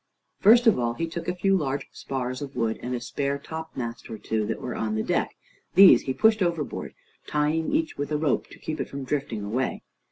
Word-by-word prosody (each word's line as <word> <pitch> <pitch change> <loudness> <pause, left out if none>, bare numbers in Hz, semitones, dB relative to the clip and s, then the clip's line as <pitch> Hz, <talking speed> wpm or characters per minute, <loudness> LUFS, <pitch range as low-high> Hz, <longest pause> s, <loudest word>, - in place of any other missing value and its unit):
First 235 +4 +6
of 225 - +5
all, 120 -1 0
he 165 - -1
took 165 +1 -6
a 180 - -1
few 195 +2 +2
large 140 -5 -1
spars 130 -1 -4
of 140 -1 -7
wood, 110 -1 -1
and 125 +1 -3
a - - -2
spare 140 +3 -2
topmast 140 -6 -6
or 110 - -5
two, 110 -1 -2
that - - -3
were 125 - -4
on 110 -1 -2
the 110 - 0
deck. - - -1 0.4
These 195 +1 +9
he 130 - -2
pushed 220 -1 +4
overboard, 170 -4 -2 0.3
tying 150 +2 0
each 315 - -1
with 145 +1 -3
a 150 - +1
rope 150 -3 0
to - - -14
keep 155 - -4
it - - -5
from 140 0 -6
drifting 130 -6 -2
away. 120 +6 -2
140 Hz, 220 wpm, -26 LUFS, 125-165 Hz, 0.4 s, These